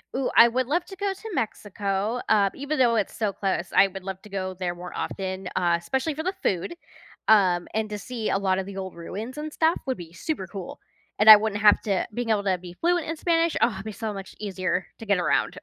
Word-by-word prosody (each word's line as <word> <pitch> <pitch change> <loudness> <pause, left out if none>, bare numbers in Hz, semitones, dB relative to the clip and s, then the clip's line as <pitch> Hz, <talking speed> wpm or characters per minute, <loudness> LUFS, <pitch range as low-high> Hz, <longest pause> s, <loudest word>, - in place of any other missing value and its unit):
Ooh, 265 -1 0
I 235 - +9
would 250 +1 -1
love 345 +4 0
to 385 - -10
go 400 0 -1
to 440 +4 -10
Mexico, 205 - -2
um, 200 -2 +4
even 285 +1 -3
though 235 -2 +4
it's 210 -3 -1
so 210 -4 0
close, 190 -3 -1
I 195 - +7
would 190 0 -9
love 190 -1 -6
to 210 - -14
go 190 -1 -3
there 180 -1 -3
more 180 +1 -9
often, 190 -1 -4
uh, 175 -2 +3
especially 265 - -2
for 315 +2 -5
the 370 +2 -1
food, 185 - -1 0.5
um, 185 -5 +4
and 220 -1 -1
to 210 - -4
see 230 +1 -4
a - - +2
lot 190 -1 +1
of 190 - -2
the 195 -1 -8
old 190 -2 -5
ruins 215 - -7
and 305 0 -5
stuff 320 +2 +2
would 260 -1 -2
be 170 -2 -10
super 190 - -4
cool, 185 0 -8 0.4
and 215 +1 +6
I 215 - +15
wouldn't 210 0 -1
have 210 -1 +6
to 195 -3 -1
being 240 0 -3
able 205 -2 +2
to 185 -2 +2
be 175 0 -10
fluent 345 -1 +1
in 325 0 -3
Spanish, 335 -1 +1
oh, 235 - +4
it'd 190 +1 -7
be 215 - -4
so 215 +1 -4
much 195 -1 -9
easier 185 -3 -2
to 225 - -8
get 200 -2 +2
around. 175 - +1
205 Hz, 245 wpm, -25 LUFS, 190-255 Hz, 0.5 s, I